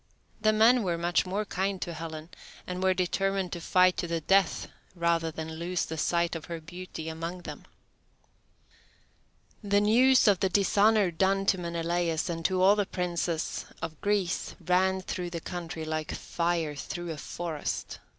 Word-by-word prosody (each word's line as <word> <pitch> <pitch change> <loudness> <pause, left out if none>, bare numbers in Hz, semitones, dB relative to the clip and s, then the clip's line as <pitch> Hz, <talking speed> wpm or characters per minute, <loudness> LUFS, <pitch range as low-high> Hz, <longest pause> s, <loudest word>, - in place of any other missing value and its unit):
The 215 0 +4
men 225 +3 +5
were 175 -5 -1
much 175 +2 +1
more 200 +3 -1
kind 195 0 -2
to 170 - -5
Helen, 160 0 -7 0.4
and 180 0 -4
were 190 0 +3
determined 190 +1 0
to 175 - -5
fight 185 +1 +4
to 175 - -2
the 170 0 -1
death 195 +3 +2 0.3
rather 170 -1 +1
than 160 0 -6
lose 175 +2 -1
the 160 - -5
sight 170 +2 +1
of 160 - -6
her 170 -1 -5
beauty 165 0 -8
among 165 +3 -5
them. - - -8 2.0
The 205 -1 +2
news 250 +4 +5
of 200 -3 +5
the 190 - +2
dishonour 200 +1 +3
done 195 +4 +1
to 190 -1 +2
Menelaus 170 -1 -1
and 165 -1 -4
to 185 -1 +2
all 200 +2 +7
the 205 -2 0
princes 170 -2 -2
of 160 -2 -6
Greece 200 -3 0
ran 185 +2 +2
through 180 -1 -4
the 170 -1 -4
country 165 -2 -5
like 155 0 -3
fire 170 -3 -1
through 175 +4 -5
a 155 - -5
forest. 160 0 -4
175 Hz, 165 wpm, -29 LUFS, 165-190 Hz, 2.0 s, all